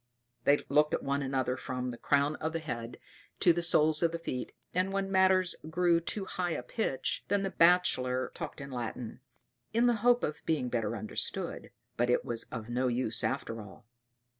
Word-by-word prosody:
They 145 +1 +4
looked 150 +1 +3
at - - -4
one 140 +1 0
another 130 -2 0
from 125 -1 -4
the 120 - -8
crown 145 +2 +2
of 160 +1 -3
the 165 - -1
head 120 -6 -5 0.4
to 175 - +6
the 175 - -1
soles 155 -2 +3
of 170 -1 +3
the 170 - -3
feet; 130 -7 -4 0.2
and 185 +2 +1
when 195 0 -1
matters 190 -1 +4 0.2
grew 170 0 +3
to 165 - -18
too 200 -2 -2
high 180 -2 -2
a - - -3
pitch, 135 - -2
then 200 0 +1
the 195 - -2
Bachelor 165 -8 +3
talked - - -6
Latin, 125 -4 -5 0.6
in 235 +1 +4
the 240 -2 +3
hope 245 0 +4
of 150 - -2
being 145 -6 0
better 120 -2 -1
understood - - -3 0.3
but 120 +1 +2
it 125 - +2
was 115 -1 -2
of 115 -3 -7
no 125 +2 0
use 120 -2 0
after 115 0 -2
all. 105 +3 -13
150 Hz, 190 wpm, -31 LUFS, 125-180 Hz, 0.6 s, to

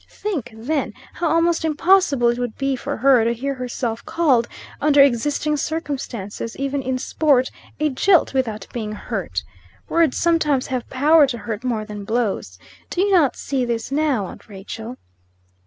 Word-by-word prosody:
Think, 345 - -4
then, 275 +7 -2 0.2
how 340 - -1
almost 330 +1 +2
impossible 315 -5 +3
it 240 +1 -1
would 245 -3 -3
be 275 -1 0
for 250 - -4
her 255 -1 +5
to 235 +1 +1
hear 275 +4 -2
herself 245 -3 -4
called, 300 -8 +2 0.3
under 290 -1 +4
existing 280 +3 +3
circumstances, 265 - -4
even 275 0 -1
in 260 0 -2
sport, 260 -1 +2 0.3
a 305 - +2
jilt, 340 +5 +3
without 225 -6 -1
being 215 -3 -4
hurt. 195 - -4 0.5
Words 330 -5 +2
sometimes 310 -6 +2
have 255 -2 -4
power 290 +3 +5
to 240 - -3
hurt 215 +1 -5
more 230 -4 -1
than 210 -1 -7
blows. 205 - -2 0.3
Do 360 - -1
you 405 +1 +2
not 330 -8 +4
see 270 -2 -2
this 235 0 -3
now, 280 -8 +1
aunt 185 - -11
Rachel?" 220 +5 -8
260 Hz, 160 wpm, -21 LUFS, 230-300 Hz, 0.5 s, her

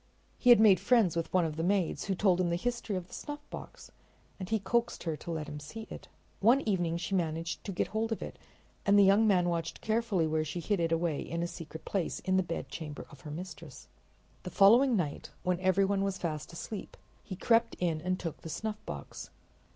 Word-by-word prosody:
He 245 -1 +8
made 210 -5 +6
friends 225 -10 +3
with 165 -1 -2
one 180 -2 +3
of 155 -1 -4
the 165 - -1
maids, 190 -1 +1
who 195 - 0
told 185 -1 +3
him 175 - +1
the 170 - +1
history 235 +2 -2
of 180 -2 -3
the - - -16
snuffbox, 295 0 -8 0.5
and 185 - -6
he 225 - +2
coaxed 235 +3 -1
her 165 -3 -1
to - - -10
let 160 -2 -3
him 150 0 -6
see 220 +10 -8
it. - - -8 0.3
One 240 +7 +5
evening 175 -7 0
she 170 +3 -4
managed 165 -2 -1
to 200 - -3
get 180 - -1
hold 220 +1 -1
of 225 - -2
it, - - -8 0.4
and 200 0 +4
the 200 - +8
young 200 +3 +5
man 180 -4 +3
watched 165 -1 -2
carefully 220 -6 +1
where 155 0 0
she 155 +3 -4
hid 200 +3 0
it 165 -1 0
away 165 -2 0
in 170 0 -3
a - - -1
secret 160 -2 -9
place 190 -4 -2
in 185 - 0
the 190 - +4
bedchamber 160 -3 -6
of 140 - -14
her 150 - -9
mistress. 180 +5 -8 0.5
The 180 - -6
following 230 +8 +6
night, 155 -8 -2
when 180 -1 0
everyone 195 +1 +2
was 195 -1 -1
fast 155 -3 -4
asleep, 195 +5 -7 0.3
he 190 - -6
crept 230 +4 +2
in 165 -3 0
and 185 +2 -1
took 165 -4 -4
the 160 - -8
snuffbox. 210 - -6
185 Hz, 215 wpm, -31 LUFS, 165-210 Hz, 0.5 s, He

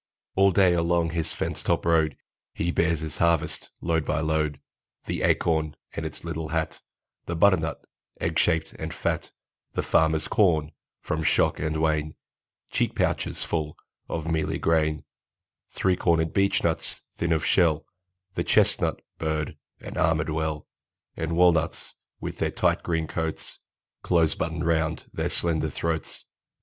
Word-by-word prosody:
All 100 +1 +5
day 95 -2 +4
along 85 -1 +2
his 80 -2 -2
fence - - -3
top - - 0
road 80 -3 +3 0.4
He 85 - 0
bears 85 -2 +1
his 80 -2 -6
harvest, 85 -1 +1
load 80 -2 +1
by 75 - 0
load; 75 -2 0 0.5
The - - -2
acorn 80 -2 +2 0.2
with 80 - -3
its 80 - -6
little 80 -1 -3
hat; 80 0 -2 0.5
The 85 - -2
butternut, 80 -3 +2 0.3
egg 80 0 0
shaped 80 -2 +1
and - - -4
fat; - - -1 0.4
The - - -1
farmer's 80 -1 +2
corn, 80 -7 +3 0.3
from 80 - -2
shock 80 - +2
and 80 0 -1
wain; 75 -1 0 0.6
Cheek - - 0
pouches - - 0
full 75 -2 -2 0.3
of 80 - -3
mealy 80 -1 0
grain; 80 -2 +1 0.7
Three 95 -1 +1
cornered 80 -3 +2
beechnuts, 100 0 +1 0.2
thin 85 0 0
of 80 -2 +1
shell; 80 -4 +3 0.5
The - - -1
chestnut, - - +2 0.2
burred 80 -2 -1 0.2
and - - -6
armored 80 - +2
well; 80 -1 -2 0.5
And 80 +1 -2
walnuts, 85 -2 +2 0.3
with - - -6
their - - +1
tight - - +1
green 80 -2 -1
coats 80 0 -4 0.4
Close 80 -3 +3
buttoned 85 0 -2
round 80 -1 0
their - - -1
slender 80 -2 0
throats. 80 +1 -3
80 Hz, 145 wpm, -26 LUFS, 80-85 Hz, 0.7 s, All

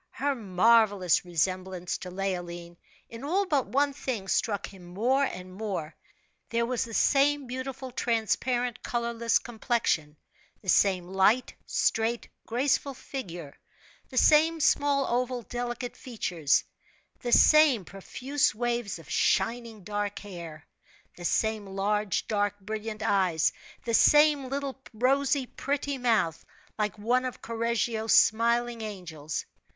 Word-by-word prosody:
Her 285 0 -1
marvelous 205 -3 +3
resemblance 185 +1 -2
to 180 - -7
Leoline, 175 -2 -4 0.3
in 230 +2 -10
all 370 +8 +1
but 290 -8 0
one 280 +2 +1
thing, 240 -8 -4
struck 200 0 0
him 190 -2 -12
more 230 +10 +1
and 185 -8 -5
more 185 -6 -4 0.5
there 235 0 +1
was 245 0 -1
the 230 - -10
same 285 0 +3
beautiful 260 +1 -6
transparent 240 +1 -1
colorless 235 -1 0
complexion, 225 - -1 0.4
the 190 - -7
same 185 -2 +3
light, 195 +6 +2
straight, 225 +1 0 0.2
graceful 270 +3 0
figure, 175 - -7 0.5
the 255 - -8
same 320 +4 +5
small 285 -2 +2
oval 250 0 -1
delicate 245 +1 -4
features; 175 - 0 0.6
the 240 - -4
same 295 - +6
profuse 250 - -1
waves 240 -3 -2
of 165 -3 -14
shining 225 +4 0
dark 205 0 -3
hair, 170 -6 -9 0.5
the 175 - -8
same 220 +1 0
large, 200 +1 -1
dark, 205 -1 0
brilliant 215 +1 -5
eyes; 185 -5 +2 0.3
the 230 - -2
same, 295 +1 +5
little, 275 -1 -4
rosy 270 +3 +2
pretty 280 +1 -3
mouth, 220 -10 +1 0.4
like 210 0 -1
one 240 +5 +1
of 255 -1 -5
Correggio's 230 -1 0
smiling 235 +1 +3
angels. 170 -8 -5
225 Hz, 125 wpm, -28 LUFS, 190-255 Hz, 0.6 s, same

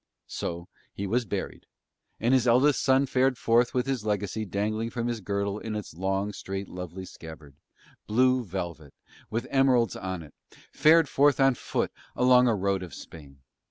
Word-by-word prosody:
So 85 +1 -5 0.3
he 100 - -4
was 120 +5 0
buried, - - -5 0.5
and 120 +4 +2
his 130 -2 +3
eldest 130 +4 +4
son 135 +1 +3
fared 130 -1 +1
forth 120 +3 +2
with 125 0 +1
his 135 -5 -2
legacy 105 0 -2
dangling 110 +4 -2
from 120 0 -4
his 120 -2 -2
girdle 100 +1 -2
in 110 -1 -5
its 105 -3 -6
long, 95 +4 -2
straight, 95 0 -5
lovely 90 +1 -7
scabbard, 80 -5 -12 0.5
blue 125 +3 +3
velvet, 85 - -6 0.3
with 115 +3 -2
emeralds 130 -5 +3
on 95 -2 -5
it, 75 - -15 0.4
fared 160 0 +5
forth 140 0 +3
on 135 -1 +5
foot - - -2 0.2
along 125 0 +5
a 115 - +3
road 100 -1 0
of 90 -3 -8
Spain. 70 -4 -12
110 Hz, 165 wpm, -27 LUFS, 95-125 Hz, 0.5 s, fared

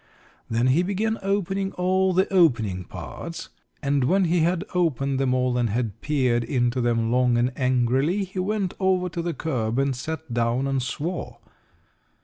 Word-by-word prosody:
Then 115 +2 +1
he 145 +7 +4
began 205 +4 -1
opening 195 0 -1
all 185 +1 +2
the 185 +1 +2
opening 115 - +3
parts, 170 - -8 0.3
and 140 -1 +1
when 190 +8 +3
he 175 0 +2
had 170 +2 +1
opened 140 -6 0
them 130 -1 +1
all 125 -1 +1
and 120 -2 +1
had 110 -1 -2
peered 130 -5 +1
into 125 0 0
them 115 -1 +1
long 125 -1 +3
and 120 +2 +2
angrily 130 - +1
he 190 0 -6
went 195 -1 -1
over 185 -1 +1
to 170 0 -4
the 170 0 -3
curb 120 -7 -2
and 135 -1 +1
sat 160 +1 -5
down 120 +3 +1
and 135 -1 0
swore. 160 +7 -4
140 Hz, 165 wpm, -24 LUFS, 125-180 Hz, 0.3 s, he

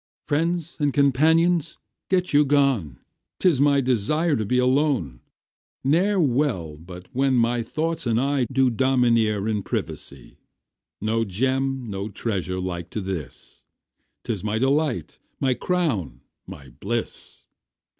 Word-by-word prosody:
Friends 165 +2 -1
and 145 -1 +2
companions 160 +4 +3 0.3
get 180 -3 +1
you 145 +1 +6
gone, 135 - +1 0.4
'Tis 165 -8 +2
my 140 -1 +4
desire 140 +6 +1
to 110 - -1
be 125 +5 0
alone; 125 - +1 0.6
Ne'er 180 +9 +2
well 125 - 0
but 90 +3 -11
when 135 0 +2
my 120 0 +2
thoughts 160 +5 -3
and 115 0 +2
I 135 -1 +1
Do 130 -1 +3
domineer 115 -4 +2
in 105 -2 0
privacy. 70 -7 -6 0.6
No 110 +2 0
Gem, 130 +5 -1
no 100 0 -4
treasure 95 -4 -3
like 90 -2 -4
to 110 - -4
this, 95 -8 -7 0.6
'Tis 105 -5 -3
my 105 0 -1
delight, 135 - 0 0.2
my 130 -2 +2
crown, 115 - -1 0.3
my 70 -2 -10
bliss. 100 - -5
125 Hz, 125 wpm, -24 LUFS, 100-145 Hz, 0.6 s, you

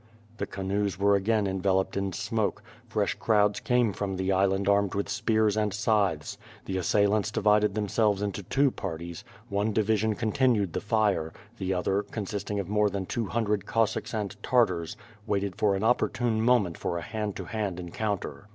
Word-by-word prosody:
The - - -3
canoes 100 0 -2
were 100 0 +4
again 105 +2 +1
enveloped 95 0 0
in 100 0 -1
smoke; 105 +3 -2 0.3
fresh - - 0
crowds 105 -2 +2
came 125 -4 +2
from 100 -1 -3
the 95 +1 -1
island 95 +1 +2
armed 100 -1 +2
with 100 - -1
spears 110 +1 +1
and 105 -1 +1
scythes. 100 -7 0 0.3
The 95 - -2
assailants 100 +3 +2
divided 105 -1 +2
themselves 105 -1 +1
into 100 0 -3
two 135 +8 +2
parties; 85 -4 -6 0.2
one 100 +2 0
division 110 0 +1
continued 110 - +1
the - - -2
fire; 105 -7 +1 0.3
the 95 -2 -3
otlier, 95 +2 +1
consisting 105 -1 -3
of 95 - -3
more 105 +1 +2
than 100 -1 -3
two 115 +3 -2
hundred 105 -2 -1
Cossacks 115 -1 0
and 105 -1 -3
Tartars 95 -8 +1 0.3
waited 100 -3 -1
for 100 -2 +2
an 95 - -2
opportune 120 -1 +1
mo 125 +2 +5
ment 90 -7 -4
for 85 - -2
a 85 - -5
hand 105 -1 -4
to - - -6
hand 105 -5 -3
encounter. 100 +3 -4
100 Hz, 170 wpm, -28 LUFS, 95-110 Hz, 0.3 s, mo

